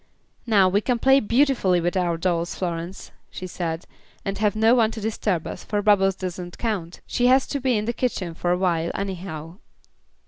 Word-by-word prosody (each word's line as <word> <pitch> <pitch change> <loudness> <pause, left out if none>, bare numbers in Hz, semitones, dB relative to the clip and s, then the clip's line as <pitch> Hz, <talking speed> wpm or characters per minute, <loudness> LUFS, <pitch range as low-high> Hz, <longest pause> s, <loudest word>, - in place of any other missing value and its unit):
"Now 200 -4 +5
we 200 +3 +2
can 245 +2 0
play 270 +3 +5
beautifully 235 -6 +2
with 175 +2 -1
our 175 -3 +1
dolls, 170 0 -1
Florence," 175 +1 -5 0.2
she 185 - -7
said, 170 -2 -4 0.4
"and 195 -1 -3
have 210 -1 +2
no 220 +2 +4
one 230 -3 +4
to 225 - -7
disturb 205 -5 -1
us, - - -6
for 205 -1 -2
Bubbles 195 -2 +4
doesn't 180 -2 -6
count. 190 -7 -3
She 245 - +1
has 260 +1 +5
to 280 - -2
be 255 -3 +1
in 210 - -2
the 235 - -1
kitchen 200 -9 -2
for 175 +2 -2
a 180 - +2
while 170 -3 0
anyhow." 180 -4 -5
195 Hz, 195 wpm, -24 LUFS, 175-220 Hz, 0.4 s, Now